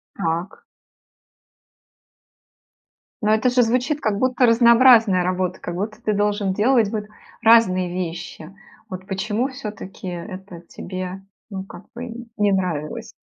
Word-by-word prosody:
Так. 170 +1 -3 2.6
Но 210 - +2
это 220 +4 +2
же 245 0 +3
звучит 250 +6 0
как 205 -2 -1
будто 255 0 +2
разнообразная 235 -4 +6
работа, 185 0 -2
как 175 - -5
будто 210 +4 -5
ты 215 - +1
должен 205 -1 0
делать 220 +1 +2
вот 215 -1 -3 0.4
разные 220 -6 +4
вещи. 175 -1 -6 0.4
Вот 185 0 -7
почему 210 +5 -1
всё-таки 210 -7 -8
это 180 0 -8
тебе, 185 +2 -7 0.3
ну, 190 -2 -6
как 195 -1 -12
бы, 240 0 -8
не 205 -1 +2
нравилось? 190 +4 -2
205 Hz, 120 wpm, -21 LUFS, 185-230 Hz, 2.6 s, разнообразная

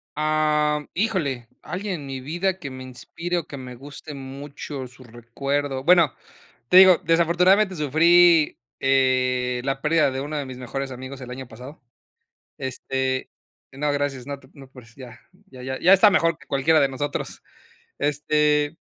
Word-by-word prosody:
Am, 150 -1 +1
híjole, 160 - -1
alguien 190 +3 -4
en 140 - -9
mi 135 -1 -6
vida 175 +7 -2
que 140 - -6
me 130 0 -8
inspire 130 +8 -5
o 165 - -3
que 140 - -8
me 125 -1 -9
guste 145 +4 -10
mucho 135 0 -8
su 125 +1 -17
recuerdo. 130 +4 -4
Bueno, 170 -4 +5 0.6
te 180 - +6
digo, 185 -2 +9
desafortunadamente 180 +4 +3
sufrí, 165 +2 +4 0.2
eh, 130 -2 +1
la 135 0 -2
pérdida 155 -3 +2
de 130 - -4
uno 150 +2 -4
de 145 - -3
mis 130 -1 -8
mejores 135 +2 -5
amigos 130 +1 -8
el 125 - -8
año 130 0 -7
pasado. 125 +6 -12 0.8
Este, 130 0 -3 0.4
no, 145 +2 -2
gracias, 140 -3 -3
no 140 -1 -5
te 130 - -20
preocupes, 130 -5 -15
ya, 125 -3 -12 0.3
ya 130 -8 -12
ya 130 +1 -4
ya 185 +3 +6
está 200 +2 +7
mejor 165 -2 +2
que - - -19
cualquiera 155 +3 +3
de 140 - +2
nosotros, 145 +2 -4 0.6
este, 150 +1 +1
140 Hz, 160 wpm, -23 LUFS, 130-160 Hz, 0.8 s, digo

